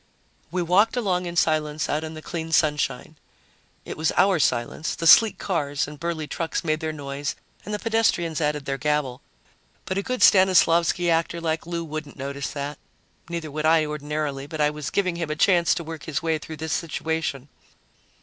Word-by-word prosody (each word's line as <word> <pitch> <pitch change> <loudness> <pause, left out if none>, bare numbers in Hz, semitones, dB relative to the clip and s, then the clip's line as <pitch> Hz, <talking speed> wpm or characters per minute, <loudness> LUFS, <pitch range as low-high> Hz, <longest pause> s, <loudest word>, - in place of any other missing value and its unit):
We 180 0 -1
walked 205 +8 +3
along 180 -6 0
in 170 - -5
silence 155 -2 +1
out 150 +2 -1
in 160 0 -6
the 155 - -9
clean 165 -2 -5
sunshine. 155 -2 0 0.7
It - - -7
was 160 0 +1
our 190 -3 +4
silence; 125 +3 0
the 165 - -4
sleek 220 +6 +7
cars 145 -6 -1
and 150 0 -10
burly 170 -2 -3
trucks 165 +2 -3
made 155 -1 0
their 160 -1 -2
noise 140 -1 -4 0.3
and 210 - -7
the 210 - -1
pedestrians 210 -8 +1
added 150 -1 -1
their 135 0 -3
gabble, 150 -4 -1 0.6
but 190 +1 -1
a - - 0
good 255 +3 -1
Stanislavsky 175 -2 +5
actor 165 +1 0
like 165 0 -2
Lou 170 -1 -3
wouldn't 155 -2 -7
notice 140 +1 -4
that. 145 0 -5 0.5
Neither 165 -3 -4
would 155 +2 -1
I, 160 -1 +4
ordinarily, 150 -2 -3
but 155 +1 -7
I 150 0 +3
was 150 -1 -5
giving 185 -4 0
him 165 -3 -3
a 155 - -1
chance 170 +1 +3
to 170 - -4
work 160 -1 -8
his 150 -2 -3
way 160 -1 0
through 160 +1 -8
this 160 +1 -3
situation. 160 -4 -2
160 Hz, 190 wpm, -24 LUFS, 150-170 Hz, 0.7 s, sleek